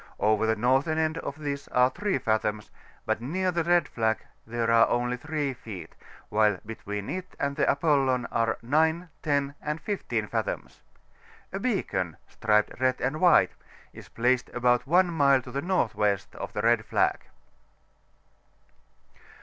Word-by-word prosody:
Over 110 +1 +2
the 110 - +2
northern 135 +8 +2
end 160 0 0
of 140 - -6
this 145 -2 -4
are 125 +1 +3
3 205 -1 -1
fathoms, 110 -1 -1 0.3
but - - -1
near 185 +9 -1
the 170 -1 0
red 175 -2 +3
flag 110 -1 -1 0.2
there 115 0 0
are 115 0 +6
only 120 +1 0
3 145 +1 -3
feet, 110 -7 -9 0.4
while 105 -2 +3
between 105 -2 -6
it 185 0 -5
and 140 0 -1
the - - +2
ApoUon 135 -4 +2
are 115 -1 +1
9, 160 +6 +1
10, 140 -2 0
and 150 +1 -3
15 205 +5 -2
fathoms. - - -4 0.7
A 195 - -2
beacon, 95 - -1
striped 105 0 +1
red 130 0 +1
and 135 +5 -2
white, 180 -1 +5 0.4
is - - -12
placed 125 +2 +1
about 125 0 +2
one 175 +2 +3
mile 140 -4 +4
to 125 - -10
the 140 +2 -2
N.W. 110 - +1 0.2
of - - -6
the 105 - -2
red 115 -1 +3
flag. - - +1
130 Hz, 150 wpm, -27 LUFS, 115-160 Hz, 0.7 s, are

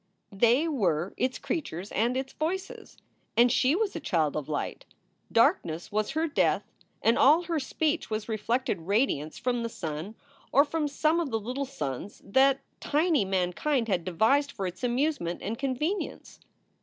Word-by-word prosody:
they 240 +10 +3
were 190 - 0
its 255 0 -1
creatures 200 - -4
and 235 +4 +1
its 265 0 -4
voices. 360 +5 -4 0.4
And 240 +1 +6
she 260 +4 +3
was 415 0 -1
a - - -2
child 160 - 0
of 155 -1 -4
light. 150 - -3 0.5
Darkness 160 +1 +2
was 210 0 0
her 315 +2 +1
death, 295 - +2 0.4
and 230 +2 +4
all 310 +5 +6
her 335 -2 -1
speech 310 +4 -1
was 215 -1 -3
reflected 230 -1 -1
radiance 200 - +1
from 245 -1 -1
the 230 - -2
sun 165 +2 -5 0.4
or 280 +3 +6
from 305 0 -1
some 310 +3 +1
of 330 -4 -1
the 225 -2 -1
little 250 +6 -3
suns 155 - -5
that 265 +6 +4 0.2
tiny 305 - +2
mankind 195 +8 0
had 185 -5 0
devised 225 - +2
for 195 - -4
its 180 +3 -6
amusement 245 - 0
and 225 +3 -3
convenience. 285 +9 -3
245 Hz, 160 wpm, -28 LUFS, 195-290 Hz, 0.5 s, And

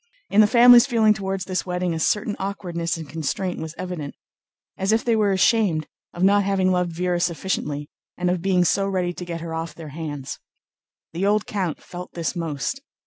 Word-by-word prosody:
In 210 - +6
the 210 - +6
family's 245 +2 +8
feeling 225 -4 +4
toward 195 -2 -3
this 185 0 -2
wedding 180 -1 -2
a 160 - -3
certain 210 +5 0
awkwardness 175 -4 -3
and 160 -2 -7
constraint 165 +4 -3
was 160 0 -6
evident, 175 -6 -5 0.6
as 190 +2 0
if 220 +1 +1
they 235 -2 +3
were 210 -2 +2
ashamed 190 -5 +2 0.3
of 175 - -4
not 200 +1 +5
having 190 -1 +1
loved 180 -1 +1
Véra 175 0 0
sufficiently 160 -4 -2 0.3
and 180 0 +1
of 180 -1 -1
being 180 -1 +2
so 195 +3 +2
ready 180 -2 -1
to 180 - -7
get 170 -1 -5
her 165 -1 -5
off 160 -1 -4
their 160 -2 -9
hands. 145 -3 -6 0.7
The 185 +4 0
old 210 0 +2
count 185 -7 -3
felt 180 0 -9
this 170 +2 -3
most. 165 - -3
180 Hz, 195 wpm, -23 LUFS, 165-200 Hz, 0.7 s, family's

